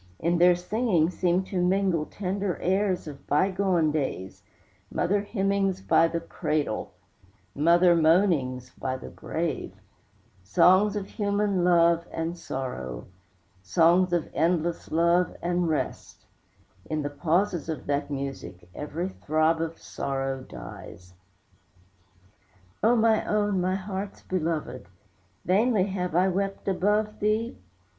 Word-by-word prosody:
In 170 +5 0
their 175 0 +6
singing 180 -2 +1
seem 180 +1 +1
to 185 -1 -2
mingle 180 -4 +1
Tender 195 -1 -3
airs 190 -1 0
of 140 -2 -10
bygone 185 -1 +2
days; 135 -11 -3 0.5
Mother 200 +3 +1
hymnings 195 -2 0
by 165 -3 +3
the 170 0 -2
cradle, 155 -7 -2 0.6
Mother 170 +3 +4
moanings 155 -7 +2
by 130 0 -4
the - - -9
grave, 160 -3 -4 0.7
Songs 185 - +4
of 205 -2 -3
human 200 -2 0
love 170 -1 +4
and 165 +1 -3
sorrow, 125 - -5 0.6
Songs 170 - +3
of 175 -3 0
endless 170 +1 0
love 170 +2 +2
and 175 -1 0
rest; 155 - -4 0.6
In 155 -1 -1
the 145 - -3
pauses 170 +3 0
of 160 - -4
that 145 0 -1
music 135 -10 -6
Every 160 +5 -4
throb 160 -1 +1
of 165 0 -3
sorrow 135 -1 -3
dies. 90 -7 -11 1.7
O 230 +3 +4
my 225 -1 +3
own, 205 -3 +1
my 185 +1 0
heart's 195 +1 -5
belovèd, 160 -8 -3 0.6
Vainly 210 +2 +3
have 180 -3 -3
I 180 +2 +4
wept 195 +2 -2
above 210 +3 +1
thee? 215 +3 0
175 Hz, 120 wpm, -26 LUFS, 155-195 Hz, 1.7 s, their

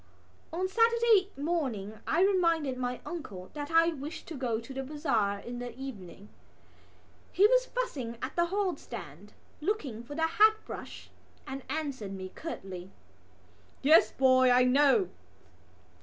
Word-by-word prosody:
On 360 +3 -1
Saturday 455 -1 +4
morning 260 - -2
I 335 - +2
reminded 335 -8 +2
my 250 0 -3
uncle 200 - -7
that 290 -1 -5
I 330 0 +5
wished 300 0 -7
to - - -5
go 245 -4 -1
to 235 +4 -10
the 270 - -3
bazaar 265 -8 0
in 240 +4 -7
the 245 -1 -7
evening. 210 -7 -9 1.0
He 395 - +5
was - - +4
fussing 265 - -3
at 260 - -5
the 345 0 +2
hallstand, 235 - -4 0.3
looking 300 - -2
for 285 +4 -9
the 320 +1 +1
hat 430 +7 +5
brush, - - -9 0.3
and 270 +1 -6
answered 275 -10 -3
me 185 -1 -6
curtly: 190 - -7 0.9
"Yes, 310 +4 +6
boy, 255 -1 +4
I 250 0 +5
know." 285 +9 +4
275 Hz, 140 wpm, -30 LUFS, 235-340 Hz, 1.0 s, Yes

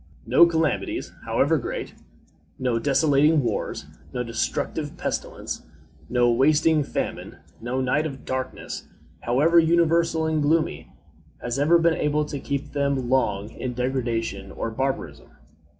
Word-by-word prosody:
No 170 - +6
calamities, 160 -2 -1
however - - +2
great - - -5 0.6
no 125 -3 0
desolating 145 +2 +3
wars, - - -2 0.3
no 125 - -2
destructive 115 -2 -3
pestilence, - - -4 0.5
no 120 -1 +3
wasting 150 +4 +3
famine, - - -4 0.2
no 125 +3 -2
night 145 +5 +1
of 135 -3 -9
darkness, 130 0 -4 0.3
however 145 - +4
universal 165 0 +3
and 160 -1 +1
gloomy 145 - 0 0.5
has 120 +2 -3
ever 160 +4 +5
been 170 0 +3
able 150 -1 0
to 145 -1 -5
keep 140 +1 -4
them 140 -3 -1
long 110 -5 +1
in 125 -1 -5
degradation 115 -6 -2
or 115 - -4
barbarism. 135 +4 -3
140 Hz, 125 wpm, -24 LUFS, 125-155 Hz, 0.6 s, No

